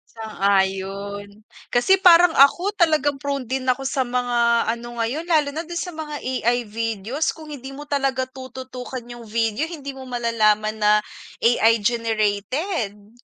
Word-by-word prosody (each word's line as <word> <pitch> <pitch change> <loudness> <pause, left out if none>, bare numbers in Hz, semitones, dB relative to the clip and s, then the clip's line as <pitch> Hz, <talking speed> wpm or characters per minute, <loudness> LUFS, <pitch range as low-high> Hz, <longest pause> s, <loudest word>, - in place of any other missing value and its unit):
Sang-ayon. 200 0 -2 0.2
Kasi 245 +11 +4
parang 350 -2 +7
ako 350 +9 +4
talagang 310 -6 +2
prone 280 -3 -2
din 260 +2 -2
ako 260 +1 0
sa 265 0 0
mga 240 -1 +1
ano 235 +1 -4
ngayon 245 +8 -1
lalo 305 -4 +1
na 325 - -2
dun 345 +1 -6
sa 360 -3 -5
mga 300 -2 -5
AI 245 -1 0
videos 225 +6 -2
kung 315 -1 -11
hindi 275 -3 -8
mo 290 +2 -9
talaga 270 -2 0
tututukan 260 -1 -8
yung 240 -1 -10
video, 225 +7 -1
hindi 280 -4 -7
mo 265 - -10
malalaman 215 -3 +1
na 210 0 +5 0.5
AI 230 -1 +4
generated. 215 - -1
245 Hz, 145 wpm, -22 LUFS, 220-285 Hz, 0.5 s, parang